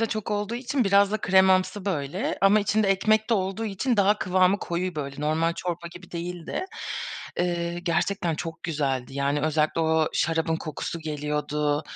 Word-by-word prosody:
da 225 - +2
çok 215 -1 -4
olduğu 210 +2 -1
için 255 0 0
biraz 200 0 +4
da - - +2
kremamsı 190 +1 +3
böyle 165 -1 -2
ama 200 +2 +5
içinde 210 0 +1
ekmek 215 +3 +2
de 230 - +5
olduğu 195 +3 -1
için 220 +4 -1
daha 205 +1 +4
kıvamı 185 +1 +3
koyu 180 0 -3
böyle, 140 -1 -5
normal 160 +2 +1
çorba 175 -1 -4
gibi 175 0 -12
değildi. 175 - -4 0.7
Eee, 175 -1 -1
gerçekten 175 0 0
çok 165 +1 -6
güzeldi. 135 -5 -2
Yani, 140 +1 0
özellikle 155 +1 +1
o 160 -1 +2
şarabın 160 0 +1
kokusu 160 +1 -5
geliyordu. 150 -1 -1
175 Hz, 160 wpm, -26 LUFS, 155-200 Hz, 0.7 s, ama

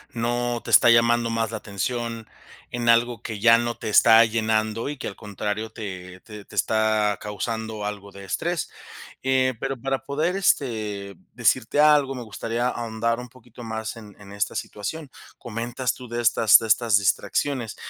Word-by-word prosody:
no 120 +1 -1
te - - -8
está 120 - +7
llamando 115 0 +3
más 115 -1 -1
la 110 - -3
atención. 115 +2 -4 0.4
En 120 -1 -3
algo 115 -1 +3
que, 110 -3 -5
ya 115 +1 +6
no 120 0 -3
te - - -5
está 115 +2 +7
llenando, 110 +2 -1
y 150 - -5
que - - -5
al 100 - -6
contrario, 105 +2 -4
te 95 -4 -8
te 105 -2 -11
te - - -15
está 110 -2 +1
causando 110 +1 -4
algo 100 -1 -6
de 100 0 -11
estrés, 95 - -2 0.5
eh, 130 -1 +2
pero 135 -2 -3
para 135 0 -2
poder, 155 +7 -1
este, 110 - -1 0.2
decirte 120 +2 +1
algo, 145 -3 +4
me 125 - -6
gustaría 115 +2 -3
ahondar 115 -1 -2
un 125 -1 -9
poquito 120 -1 -14
más, 110 0 -5
en 105 -3 -12
en 100 -1 -13
esta 100 +1 -2
situación. 135 +8 -5 0.3
Comentas 120 +1 -3
tú, 125 -1 -11
de 120 +1 -4
estas 110 -1 +6
de 115 - -5
estas 110 0 +3
distracciones, 115 +4 -1
115 Hz, 170 wpm, -24 LUFS, 105-120 Hz, 0.5 s, está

